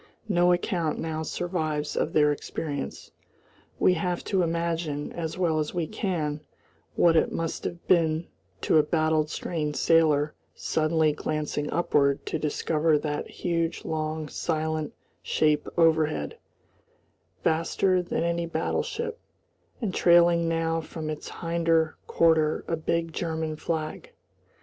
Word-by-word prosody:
No 175 -3 +4
account 175 -2 0
now 160 -1 -3
survives 160 -2 -2
of 155 - 0
their 150 -1 +4
experience. 145 0 -5 0.7
We 185 - +4
have 180 +1 -2
to 190 -2 +1
imagine 165 -3 -1
as 165 0 -4
well 165 -4 +1
as 150 +3 -3
we 170 -2 0
can 155 -6 -2 0.5
what 170 -1 +5
it 160 - +3
must 165 -1 -3
have 175 0 -5
been 165 -2 +3 0.4
to 160 - +4
a - - +5
battled 155 0 +1
strained 150 -3 -3
sailor 155 -2 +3 0.2
suddenly 155 -1 +1
glancing 150 -1 -2
upward 140 -4 +2
to 160 - -2
discover 155 +1 +1
that 150 0 -3
huge 165 -1 -2
long 155 0 -2
silent 155 0 -2 0.3
shape 150 -1 +1
overhead, 160 - +2 1.0
vaster 170 +3 +2
than 175 -1 -2
any 170 0 0
battleship, 455 - -2 0.6
and 205 -5 -1
trailing 170 -1 +5
now 165 0 0
from 155 -1 -5
its 155 - -6
hinder 165 -1 +1
quarter 160 -2 +3
a 165 - 0
big 165 +1 -1
German 160 -2 -2
flag. 160 - -4
160 Hz, 125 wpm, -27 LUFS, 155-170 Hz, 1.0 s, what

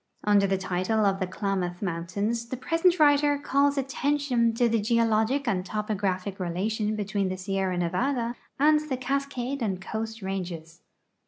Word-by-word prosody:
Under 205 -1 +4
the 195 0 +1
title 190 +3 0
of 195 -1 +2
The 185 - -1
Klamath 185 -2 -2
Mountains 200 +6 -2
the 255 - -4
present 335 +6 +2
writer 290 -1 +4
calls 280 0 +1
attention 270 -3 +1
to 240 +1 +3
the 225 -1 +1
geologic 230 +4 +2
and 190 -5 +1
topographic 200 -2 -2
relation 210 +5 -1
between 205 -2 -1
the 185 - -3
Sierra 190 -1 -1
Nevada 235 +8 0 0.2
and 300 +2 +5
the 260 - -1
Cascade 275 0 -2
and 195 -5 -1
Coast 220 +2 -5
ranges. 175 -4 -5
215 Hz, 150 wpm, -27 LUFS, 190-260 Hz, 0.2 s, and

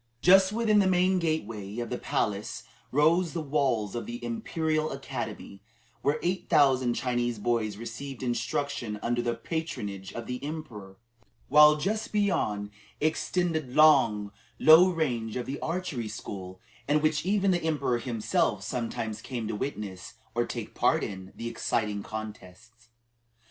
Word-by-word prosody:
Just 190 +1 +7
within 215 -1 +3
the 195 - +4
main 185 0 +3
gateway 115 - -3
of 120 -1 -4
the - - -1
palace - - -2 0.3
rose 160 +5 +3
the 170 - -2
walls 130 -8 0
of 120 - -4
the 240 +1 -6
Imperial 160 -9 -1
Academy, 100 - -6 0.4
where 145 +2 +1
eight 180 +2 -1
thousand 130 -6 +4
Chinese 120 -2 -1
boys 110 -1 -1
received 120 +4 -7
instruction 120 -1 -2
under 120 +1 0
the 120 0 -1
patronage 115 - -4
of 115 - -6
the 125 +1 -5
emperor, 120 -11 -7 0.5
while, 150 +1 +8
just 210 +8 -2
beyond 105 - 0 0.3
extended 160 0 0
the 125 - -11
long, 130 -10 +5 0.3
low 160 +4 +8
range 125 -10 -1
of 125 - -2
the 140 - -4
archery 165 -9 -3
school, 95 -3 -7 0.3
in 150 +1 +4
which 155 0 +1
even 195 +1 +2
the 175 -1 +1
emperor 140 -6 0
himself 115 -3 0
sometimes 115 -3 -3
came 120 -5 -4
to 105 - -3
witness, 105 -6 -5 0.2
or 120 0 0
take - - -6
part - - +2
in, 95 -1 -6
the 115 - -5
exciting 105 -3 -1
contests. 110 +2 -9
125 Hz, 145 wpm, -28 LUFS, 110-160 Hz, 0.5 s, while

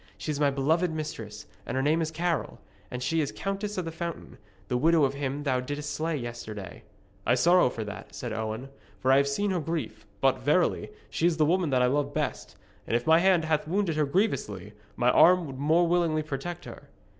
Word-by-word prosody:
She 155 - -3
is 145 - -3
my 145 -1 +4
beloved 155 +6 +1
mistress, 115 -10 -6 0.2
and - - -4
her 135 - +1
name 155 +3 +2
is 160 - -1
Carol, 170 +1 -2 0.3
and 125 0 -5
she 165 +4 +1
is 145 - -2
Countess 200 +1 -4
of 180 - -2
the 165 - -4
Fountain, 170 0 -6 0.3
the 125 - -1
widow 160 +4 +4
of 135 -1 +2
him 140 +1 -3
thou 130 -3 +1
didst 145 +3 -4
slay 160 0 -1
yesterday.' 110 -6 -7 0.5
'I 120 - +5
sorrow 175 +3 +5
for 115 -2 -5
that,' 105 -1 -9
said 120 -3 -5
Owen, 110 +4 -4 0.3
'for 130 +7 +1
I 135 - +6
have 140 0 +3
seen 195 +9 0
her 180 - 0
grief. 150 -9 -4
But, 135 -1 +2
verily, 150 +7 +1 0.2
she 170 - +2
is 170 -2 +1
the 155 - +4
woman 175 +1 +2
that 130 -2 +3
I - - +5
love 140 +2 0
best. 150 -3 -3 0.3
And - - 0
if 120 - 0
my 160 +1 +6
hand 180 -3 +3
hath 155 -1 0
wounded 185 -1 0
her 155 -1 +2
grievously, 105 - -1 0.2
my 125 +1 +3
arm 180 +4 +6
would 135 -3 -8
more 160 +4 +3
willingly 165 -3 +1
protect 155 +4 -5
her.' - - -11
150 Hz, 215 wpm, -28 LUFS, 130-170 Hz, 0.5 s, I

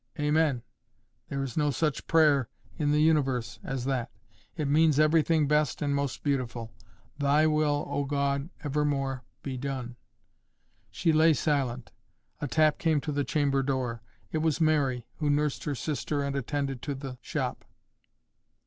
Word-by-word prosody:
"Amen. 150 -4 +2 0.7
There 140 0 -2
is 130 -3 -5
no 150 -1 +2
such 150 +2 -1
prayer 150 -6 +4 0.3
in 150 -2 +1
the 150 +1 +3
universe 135 -7 +1
as 135 -2 -3
that. 130 -3 -1 0.5
It 150 -3 -1
means 155 0 +4
everything 155 0 +3
best 150 +1 +1
and 145 -2 0
most 140 -2 -2
beautiful. 120 -5 -2 0.5
Thy 145 +2 +4
will, 150 -1 +2
O 145 - -1
God, 140 +1 -1
evermore 140 -3 -1 0.2
be 135 -2 -4
done." 130 -2 -4 0.9
She 165 -3 +1
lay 160 0 +5
silent. 130 -7 -1 0.5
A 145 - -2
tap 155 +2 +3
came 160 -3 +2
to 150 - -3
the 145 0 0
chamber 140 -2 +1
door. 130 -4 -2 0.3
It 155 - 0
was 160 0 +1
Mary, 140 -7 +2
who 150 -2 0
nursed 145 0 0
her 145 - -1
sister 145 +1 -2
and 140 0 -2
attended 140 -1 -2
to 145 - -3
the 135 -2 -7
shop. - - -3
145 Hz, 150 wpm, -28 LUFS, 135-150 Hz, 0.9 s, lay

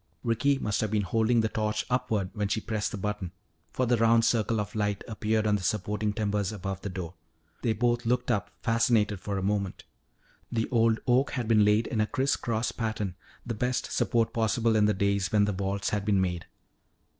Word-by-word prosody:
Ricky 120 +4 +2
must 105 -6 -1
have 110 - 0
been 105 -1 +1
holding 115 +4 +2
the 110 - +1
torch 105 -1 -1
upward 115 -7 -1
when 105 -2 -1
she 110 - 0
pressed 110 -1 -2
the - - -4
button, 100 -3 -3 0.4
for 130 - 0
the 120 0 +2
round 115 0 +4
circle 115 -1 +1
of 105 0 -4
light 105 -2 -1
appeared 110 -1 0
on 105 -1 +3
the - - -7
supporting 105 +3 -1
timbers 105 -1 -1
above 95 -2 -5
the 100 - -4
door. 90 -2 -6 0.5
They 115 - +1
both 120 +2 +1
looked 125 +1 0
up, 100 -5 -1
fascinated 115 -3 +2
for 100 +1 -3
a 95 - -2
moment. 100 -1 -1 0.7
The 115 -1 0
old 115 -2 +3
oak 130 +2 +2
had 125 -4 -2
been 110 -2 +5
laid 105 +2 +3
in 110 - -1
a 110 - +1
crisscross 120 -4 0
pattern, 110 -5 -3 0.3
the 120 - -3
best 125 +3 -2
support 115 -1 +1
possible 115 0 +1
in 105 -1 +4
the 105 - +2
days 100 -1 0
when 105 -1 +4
the 105 - -1
vaults 100 +1 -2
had 105 -1 -1
been 100 -1 +2
made. 90 -2 -1
110 Hz, 200 wpm, -28 LUFS, 100-115 Hz, 0.7 s, been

